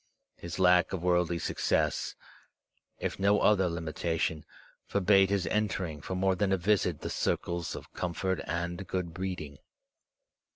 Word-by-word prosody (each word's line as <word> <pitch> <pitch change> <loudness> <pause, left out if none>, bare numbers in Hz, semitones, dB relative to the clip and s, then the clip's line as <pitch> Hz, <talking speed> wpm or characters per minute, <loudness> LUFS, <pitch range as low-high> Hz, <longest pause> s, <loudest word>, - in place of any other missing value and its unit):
His 85 -1 -7
lack 90 -1 +4
of 90 -3 -3
worldly 90 -1 +2
success, - - 0 0.8
if - - -3
no 100 +1 +4
other 95 -4 +4
limitation, 80 -1 -2 0.4
forbade 95 0 +4
his 100 -2 +1
entering 95 -8 -1
for 95 - -4
more 95 +1 +2
than 95 +1 0
a 95 - +3
visit 90 -3 +1
the - - -4
circles 85 -1 -1
of - - -10
comfort 90 +1 -2
and 85 +2 -3
good 90 -3 -3
breeding. 80 -6 -5
90 Hz, 135 wpm, -30 LUFS, 85-95 Hz, 0.8 s, lack